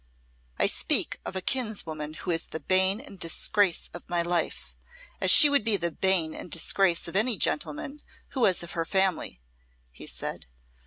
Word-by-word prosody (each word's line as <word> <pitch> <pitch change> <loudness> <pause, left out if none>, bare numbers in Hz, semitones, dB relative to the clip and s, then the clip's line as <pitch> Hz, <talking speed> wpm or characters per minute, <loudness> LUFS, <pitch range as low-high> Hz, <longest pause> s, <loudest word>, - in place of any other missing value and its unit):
"I - - +2
speak - - 0
of - - -6
a 190 - -2
kinswoman 170 - -3
who 175 - -5
is 165 -1 0
the 160 - -6
bane 190 +3 +2
and 230 -8 -12
disgrace 175 +2 0
of 175 - -10
my 175 -1 0
life, 170 -1 -3 0.5
as - - +2
she 300 - +10
would 285 -5 +2
be 220 -2 +2
the 170 -2 -3
bane 175 -2 +1
and - - -9
disgrace 170 +1 +2
of 170 - -7
any 220 +2 +2
gentleman 160 - -2 0.3
who 265 - -6
was 190 -7 +2
of 170 - -8
her 165 - -3
family," 190 - -1 0.5
he - - -9
said. - - -5
180 Hz, 175 wpm, -26 LUFS, 165-205 Hz, 0.5 s, she